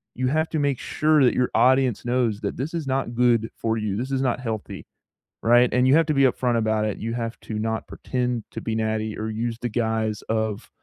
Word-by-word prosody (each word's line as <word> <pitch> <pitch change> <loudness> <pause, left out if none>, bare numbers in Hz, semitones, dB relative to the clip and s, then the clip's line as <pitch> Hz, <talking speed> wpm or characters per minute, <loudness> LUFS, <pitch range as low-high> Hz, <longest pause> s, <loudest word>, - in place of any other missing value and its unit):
you 130 0 -1
have 155 +4 +1
to 160 - 0
make 140 -3 0
sure 155 -1 +2
that 125 - +4
your 125 - +1
audience 130 -2 +3
knows 120 -4 +1
that 100 -2 -3
this 140 +7 -4
is 165 -4 -3
not 130 -3 -1
good 120 -2 +3
for 115 0 -1
you, 105 -2 -2
this 130 +4 -3
is 135 -1 0
not 125 -2 0
healthy. 110 -4 -5 0.6
Right, 120 +2 +5
and 125 +1 +3
you 130 - +5
have 165 0 +4
to 155 - 0
be 140 - +3
upfront 125 -2 +2
about 110 -1 +1
it, 105 - -3
you 115 +1 -3
have 115 -1 -4
to 110 - -6
not 110 +1 -2
pretend 125 -3 -3
to - - -5
be 115 - -3
natty 110 -1 -1
or 110 - -3
use 115 +1 -3
the 120 - -2
guise 110 -2 -1
of, 110 0 -2
120 Hz, 235 wpm, -24 LUFS, 110-130 Hz, 0.6 s, Right